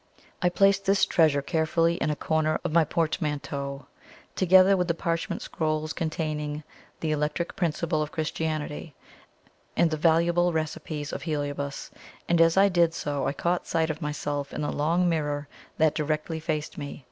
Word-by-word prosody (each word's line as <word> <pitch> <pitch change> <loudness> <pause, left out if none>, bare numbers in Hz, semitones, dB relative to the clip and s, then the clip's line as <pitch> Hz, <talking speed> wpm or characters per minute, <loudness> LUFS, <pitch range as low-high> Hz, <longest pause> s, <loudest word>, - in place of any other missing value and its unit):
I 180 - +3
placed 195 +2 +3
this 195 0 +4
treasure 150 -4 +3
carefully 165 +2 +1
in - - -1
a 150 - 0
corner 155 +1 0
of - - -2
my 165 +1 +5
portmanteau, 145 -4 -2 0.5
together 185 +1 +6
with 180 -2 0
the 170 - +1
parchment 165 0 -2
scrolls 155 0 -2
containing 155 -2 -3 0.4
"The 160 - 0
Electric 150 +3 -1
Principle 165 -2 0
of 150 0 -3
Christianity," 155 -2 -3 0.8
and 170 -1 +4
the 155 - -1
valuables 170 +2 +3
recipes 155 -1 -3
of - - -4
Heliobas; 145 -2 -3 0.4
and 170 -1 +3
as 165 +2 +4
I 195 +1 +7
did 170 -3 +2
so, 145 -2 -2
I - - 0
caught 175 +3 -1
sight 160 -1 +1
of 155 +2 -8
myself 145 -1 -3
in - - -3
the 145 - -1
long 170 +5 +1
mirror 145 -3 -1 0.3
that 155 -1 +3
directly 155 +1 -2
faced 155 -1 -3
me. 145 -1 -6
160 Hz, 160 wpm, -27 LUFS, 150-170 Hz, 0.8 s, I